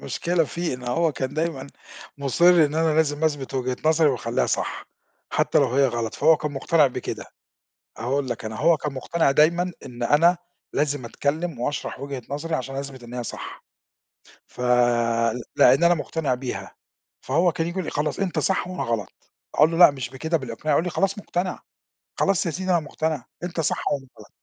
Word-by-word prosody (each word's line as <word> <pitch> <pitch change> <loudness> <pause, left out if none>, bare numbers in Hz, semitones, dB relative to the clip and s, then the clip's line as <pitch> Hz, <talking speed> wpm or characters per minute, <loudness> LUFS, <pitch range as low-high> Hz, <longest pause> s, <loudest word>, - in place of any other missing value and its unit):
مشكلة 170 -1 0
فيه 170 -2 -3
إن 125 - -9
هو 160 +6 +1
كان 130 0 -4
دايمًا 155 -4 -2 0.5
مُصِر 140 +5 +3 0.2
إن 150 +1 -2
أنا 160 -1 +2
لازم 155 -1 +1
أثبت 145 -4 -1
وجهة 130 -1 -1
نظري 160 0 +4
وأخلّيها 120 -3 0
صح، - - -2 0.5
حتى - - +2
لو 140 - +4
هي 140 0 +5
غلط، 115 -3 -3
فهو 160 +2 +5
كان 150 -1 -4
مقتنع 150 +2 +3
بكده. 130 - -5 0.7
أقول 130 +3 -1
لك 120 - -4
أنا 110 0 -5
هو 170 -1 +4
كان 150 -1 -4
مقتنع 140 +3 0
دايمًا 170 +5 +3
إن 120 -1 -8
أنا 165 +8 +4 0.4
لازم 145 -3 -1
أتكلم 145 +5 -2
واشرح 145 0 -3
وجهة 140 -2 -5
نظري 155 +3 -3
عشان 135 -1 -3
أثبت 135 -2 -6
إن 120 +1 -10
هي 125 - -3
صح، - - -8 0.8
ف - - -13 1.0
لأن 135 +7 +6
أنا 175 0 +6
مقتنع 150 -4 -2
بيها، 125 0 -6 0.5
فهو 170 +6 +2
كان 165 - -2
ييجي 175 +2 -5
يقول 185 - -1
لي: - - -4
"خلاص 150 +1 -2
أنت 195 -3 -1
صح 190 -2 0
وأنا 185 -1 -4
غلط"، 115 -5 -4 0.2
أقول 155 +2 +5
له: 165 - -2
"لأ 175 - +9
مش 130 -4 -6
بكده، 160 +6 -1
بالإقناع"، 130 +2 -3
يقول 160 - +2
لي: 180 - -2
"خلاص 195 +3 0
مقتنع، 180 -2 -3 0.6
خلاص 195 -3 +2
يا 165 - 0
سيدي 185 +3 -4
أنا 175 - +4
مقتنع 155 -2 -3 0.2
أنت 175 -1 -4
صح 155 - -1
وأنا 140 -2 -2
غلط.". - - -13
150 Hz, 185 wpm, -24 LUFS, 130-165 Hz, 1.0 s, لأ